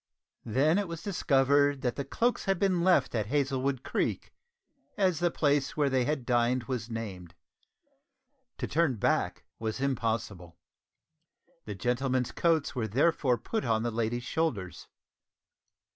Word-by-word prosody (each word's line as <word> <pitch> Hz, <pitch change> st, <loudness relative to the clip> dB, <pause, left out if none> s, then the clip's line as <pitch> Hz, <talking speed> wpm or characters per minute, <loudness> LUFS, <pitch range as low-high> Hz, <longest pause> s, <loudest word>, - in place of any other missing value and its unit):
Then 145 Hz, -, +3 dB
it 205 Hz, -, -2 dB
was 165 Hz, -1 st, -7 dB
discovered 145 Hz, -6 st, +2 dB
that 125 Hz, -2 st, 0 dB
the 140 Hz, -, -3 dB
cloaks 235 Hz, -, 0 dB
had 195 Hz, -2 st, +1 dB
been 185 Hz, -2 st, +1 dB
left 185 Hz, 0 st, +3 dB
at 110 Hz, -4 st, -1 dB
Hazlewood 135 Hz, -1 st, 0 dB
Creek, -, -, -2 dB, 0.6 s
as 185 Hz, -5 st, +2 dB
the 175 Hz, 0 st, +2 dB
place 145 Hz, -4 st, 0 dB
where 145 Hz, -2 st, +2 dB
they 130 Hz, -2 st, +2 dB
had 140 Hz, -2 st, -2 dB
dined 120 Hz, +1 st, +2 dB
was 125 Hz, -3 st, -4 dB
named. 100 Hz, -7 st, -6 dB, 1.2 s
To -, -, -3 dB
turn 160 Hz, -4 st, +1 dB
back 105 Hz, -, 0 dB, 0.2 s
was 110 Hz, +1 st, -3 dB
impossible. 110 Hz, -9 st, -2 dB, 1.1 s
The 105 Hz, -, -5 dB
gentlemen's 125 Hz, +3 st, 0 dB
coats 165 Hz, -3 st, +1 dB
were 120 Hz, -4 st, -2 dB
therefore 130 Hz, +1 st, +2 dB
put 220 Hz, -, -3 dB
on 110 Hz, -2 st, +1 dB
the 120 Hz, -, -1 dB
ladies' 115 Hz, +2 st, -2 dB
shoulders. 125 Hz, -, -2 dB
130 Hz, 140 wpm, -29 LUFS, 115-155 Hz, 1.2 s, Then